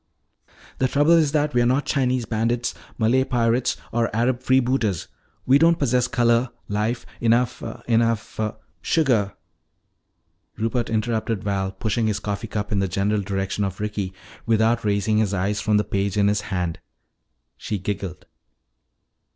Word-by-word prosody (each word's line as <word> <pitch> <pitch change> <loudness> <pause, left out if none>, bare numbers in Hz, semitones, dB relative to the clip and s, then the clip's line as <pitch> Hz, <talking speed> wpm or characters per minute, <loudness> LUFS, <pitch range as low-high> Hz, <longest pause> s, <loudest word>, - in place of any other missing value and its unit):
"The 130 - +3
trouble 145 +5 +3
is 160 -4 +5
that 150 -2 +1
we 120 - +3
are - - +3
not 130 +4 +1
Chinese 130 -3 +1
bandits, 115 +2 -1 0.2
Malay 120 +3 +3
pirates, 120 -1 +1
or 115 0 +1
Arab 120 +2 +1
freebooters. 130 -7 +1 0.4
We 135 +2 +5
don't 165 +1 +5
possess 125 -3 +2
color, 120 0 +2 0.2
life, 105 +4 -1
enough 120 +1 +2 0.3
enough 115 -2 +1 0.3
" - - -42
"Sugar," 115 - +2 1.2
Rupert 115 +2 -1
interrupted 110 -1 -1
Val, 95 -1 -1
pushing 110 +2 -1
his 105 -2 0
coffee 105 +2 -4
cup 105 -1 -4
in 100 - +1
the 95 - +1
general 100 +3 0
direction 95 +1 -2
of 95 -1 -3
Ricky 105 -2 -3 0.4
without 115 +1 +2
raising 105 +1 +1
his 105 -2 +1
eyes 100 +3 -1
from 105 -1 +2
the 105 - +2
page 100 0 -1
in 100 0 +4
his 105 0 +1
hand. 90 -4 -2 0.8
She 105 - -4
giggled. 95 -1 -5
110 Hz, 150 wpm, -23 LUFS, 100-125 Hz, 1.2 s, is